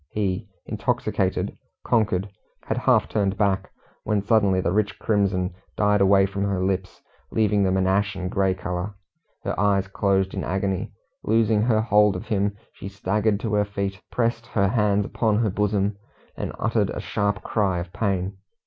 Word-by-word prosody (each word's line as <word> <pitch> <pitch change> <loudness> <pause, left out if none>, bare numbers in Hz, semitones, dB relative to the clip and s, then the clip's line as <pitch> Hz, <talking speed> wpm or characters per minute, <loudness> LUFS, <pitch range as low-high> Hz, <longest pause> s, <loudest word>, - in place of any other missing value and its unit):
He, 100 0 -2 0.2
intoxicated, 110 -4 -1 0.3
conquered, 105 -5 +1 0.4
had - - -2
half - - +3
turned 100 -2 0
back, 100 -2 +1 0.3
when 105 -2 0
suddenly 100 -3 +3
the 90 - 0
rich 100 0 0
crimson 100 -4 0 0.2
died 105 -1 +3
away 95 0 +5
from 100 +1 -4
her 95 -2 0
lips, 95 0 -3 0.3
leaving 105 -2 +2
them 95 -1 +2
an 95 - +2
ashen 95 -1 0
grey 95 0 +1
colour. 90 +2 -4 0.5
Her - - -2
eyes 100 -1 +2
closed 95 -1 +1
in 95 - -3
agony; 95 +2 -1 0.3
loosing 110 -1 +3
her 110 -1 +3
hold 105 -2 +4
of 90 +5 -5
him, 100 -1 0 0.2
she - - -8
staggered 100 +2 0
to 110 -2 -2
her 105 0 +3
feet, 100 -2 -4
pressed 115 -1 0
her 100 -3 +1
hands 105 -3 +2
upon 110 -1 +1
her 110 -3 +1
bosom, 105 0 0 0.4
and - - -4
uttered - - +1
a - - -4
sharp 100 -1 -1
cry 100 -5 0
of 85 0 -5
pain. 95 -2 -1
100 Hz, 165 wpm, -24 LUFS, 95-105 Hz, 0.5 s, away